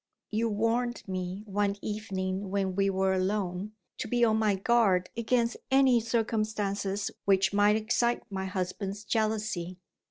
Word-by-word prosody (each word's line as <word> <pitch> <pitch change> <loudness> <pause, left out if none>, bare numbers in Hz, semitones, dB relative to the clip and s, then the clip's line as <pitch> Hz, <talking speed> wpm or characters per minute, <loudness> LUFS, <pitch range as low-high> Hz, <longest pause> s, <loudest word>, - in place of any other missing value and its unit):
You 225 +2 +1
warned 230 +3 0
me, 185 +1 -4
one 200 0 0
evening 195 -2 -3
when 195 -1 0
we 195 0 +2
were 190 0 +1
alone, 190 +1 -1 0.3
to - - -3
be 240 +1 +3
on 220 -1 +3
my 215 -2 +2
guard 195 -3 +2
against 235 +1 +1
any 265 -2 +5
circumstances 215 -3 -1
which 195 0 +3
might 205 +1 +4
excite 235 +2 +1
my 190 -1 -3
husband's 195 +2 -3
jealousy. 215 -5 -1
205 Hz, 135 wpm, -29 LUFS, 190-225 Hz, 0.3 s, any